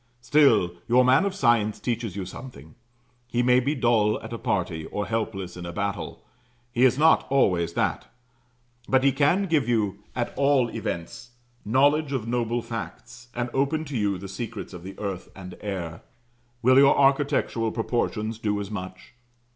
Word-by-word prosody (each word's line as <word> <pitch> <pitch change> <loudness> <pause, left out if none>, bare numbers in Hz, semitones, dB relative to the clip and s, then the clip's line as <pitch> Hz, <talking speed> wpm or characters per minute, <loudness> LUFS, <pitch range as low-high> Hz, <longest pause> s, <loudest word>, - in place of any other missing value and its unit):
Still, 120 -11 +4
your 125 +2 +4
man 130 +9 +4
of 195 -1 -2
science 120 - +2
teaches 115 -5 -3
you 100 -2 -4
something; 125 +7 -11 0.5
he 120 0 0
may 125 0 +5
be 140 +4 -1
dull 115 -4 +2
at - - -7
a 115 - -5
party, 90 -9 -2
or 105 - -3
helpless 105 -5 -3
in 90 - -8
a 85 - -5
battle, 100 +1 -4 0.5
he 120 +2 +3
is 130 0 +3
not 160 +2 +4
always 90 -11 +2
that; - - -1 0.8
but 130 0 +3
he 140 - +5
can 150 +9 +2
give 155 -8 +1
you, 105 -4 0 0.2
at 120 -1 -2
all 140 -3 +3
events, 110 +2 -6 0.3
knowledge 140 +6 +2
of 120 -4 -2
noble 120 0 -1
facts, 120 +2 -8
and 120 0 -2
open 145 +4 0
to 145 -2 -6
you 100 -4 0
the 100 +2 -8
secrets 110 +1 -6
of 90 - -8
the 95 +2 -9
earth 100 -3 -5
and 90 -1 -9
air. 90 -5 -5 0.6
Will 130 +2 +6
your 140 0 +6
architectural 135 -5 +2
proportions 115 -1 -2
do 105 -2 -1
as 100 0 -6
much? 95 -2 -8
115 Hz, 170 wpm, -25 LUFS, 100-130 Hz, 0.8 s, Will